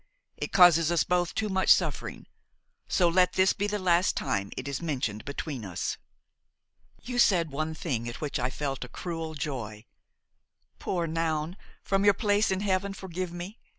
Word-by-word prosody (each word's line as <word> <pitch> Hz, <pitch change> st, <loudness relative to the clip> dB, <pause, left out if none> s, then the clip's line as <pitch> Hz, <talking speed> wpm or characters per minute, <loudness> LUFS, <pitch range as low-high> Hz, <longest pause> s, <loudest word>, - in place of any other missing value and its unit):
It -, -, -5 dB
causes 170 Hz, -3 st, +6 dB
us 170 Hz, -, +3 dB
both 180 Hz, -1 st, 0 dB
too 215 Hz, -, 0 dB
much 190 Hz, -2 st, 0 dB
suffering: -, -, +2 dB, 0.6 s
so 180 Hz, -, +3 dB
let 180 Hz, +1 st, +3 dB
this 185 Hz, 0 st, +4 dB
be 205 Hz, -, -1 dB
the 210 Hz, 0 st, -1 dB
last 180 Hz, -2 st, +2 dB
time 100 Hz, 0 st, -1 dB
it 130 Hz, -, -4 dB
is 140 Hz, +1 st, -3 dB
mentioned 125 Hz, -10 st, -2 dB
between 140 Hz, -3 st, -5 dB
us. 95 Hz, -4 st, -3 dB, 1.1 s
"You 245 Hz, 0 st, -3 dB
said 170 Hz, -9 st, +4 dB
one 155 Hz, +3 st, -3 dB
thing 125 Hz, -, -3 dB
at 120 Hz, -, -8 dB
which 150 Hz, -4 st, -3 dB
I 125 Hz, +1 st, 0 dB
felt 135 Hz, 0 st, -3 dB
a 125 Hz, -, -9 dB
cruel 165 Hz, -2 st, -5 dB
joy. 120 Hz, -8 st, -5 dB, 0.9 s
Poor 175 Hz, -3 st, -1 dB
Noun! 160 Hz, 0 st, -1 dB, 0.3 s
from 195 Hz, 0 st, +1 dB
your 205 Hz, -1 st, +5 dB
place 205 Hz, 0 st, +2 dB
in 190 Hz, 0 st, 0 dB
heaven 195 Hz, 0 st, 0 dB
forgive 185 Hz, -2 st, -5 dB
me! 175 Hz, +5 st, -7 dB
170 Hz, 170 wpm, -28 LUFS, 140-190 Hz, 1.1 s, causes